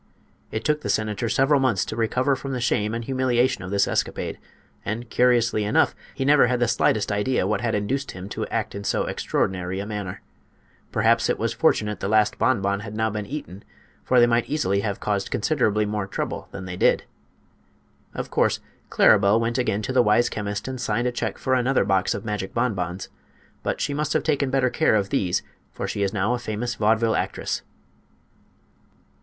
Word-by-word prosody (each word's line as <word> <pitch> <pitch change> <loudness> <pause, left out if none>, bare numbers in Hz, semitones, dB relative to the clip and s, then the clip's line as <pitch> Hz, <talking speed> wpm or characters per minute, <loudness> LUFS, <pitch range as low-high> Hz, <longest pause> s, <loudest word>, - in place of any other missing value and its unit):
It 110 - -4
took 150 0 +1
the - - -4
senator 110 +1 0
several 135 +4 +3
months 120 -8 +1
to - - -5
recover 125 +4 +1
from 135 +1 -5
the 125 - -2
shame 110 -2 0
and 115 0 -4
humiliation 130 -1 +1
of 90 - -6
this 100 0 +2
escapade; - - -2 0.4
and, 115 +4 -4
curiously 120 -3 +3
enough, 105 - +2 0.2
he 135 - -2
never 145 -2 +5
had 125 0 0
the 120 - +2
slightest 110 -2 +1
idea 105 +1 +1
what 105 +3 0
had 115 -2 0
induced 130 +7 -2
him 90 +1 -8
to - - -4
act - - -2
in 100 - -6
so - - 0
extraordinary 95 0 -2
a 100 - -4
manner. 105 -3 -5 0.7
Perhaps - - +2
it - - +1
was - - -1
fortunate 105 -1 +1
the - - -2
last 110 0 +2
bonbon 100 -6 +1
had 105 0 -7
now 110 0 0
been 105 -1 -4
eaten, 125 - -7 0.4
for 125 - +3
they 120 - +7
might 120 0 +1
easily 100 -10 +1
have 100 -1 -2
caused 100 -2 -1
considerably 105 -5 +1
more 105 -1 -2
trouble - - -4
than 95 - -8
they 90 -1 -5
did. - - +3 1.1
Of - - -5
course - - +2 0.3
Claribel 100 +1 +5
went 115 +2 -1
again 110 -4 0
to 130 - -3
the 130 - +5
wise 120 +1 +3
chemist 105 0 -4
and 130 -1 -5
signed 115 +1 0
a - - 0
check 120 -3 -3
for 130 - -1
another 130 -3 +2
box 95 -1 +1
of 100 - -6
magic 105 -3 -4
bonbons; 95 -6 -2 0.5
but - - -2
she 145 - -1
must 150 +1 -1
have - - +1
taken 145 -3 +1
better 130 -2 +2
care 155 -8 +3
of 100 -2 0
these, 90 -3 0 0.3
for - - -4
she 100 - -3
is 100 -1 +1
now 105 +4 0
a 125 - -1
famous 120 +1 -3
vaudeville 110 +1 +2
actress. - - -2
110 Hz, 195 wpm, -24 LUFS, 100-125 Hz, 1.1 s, they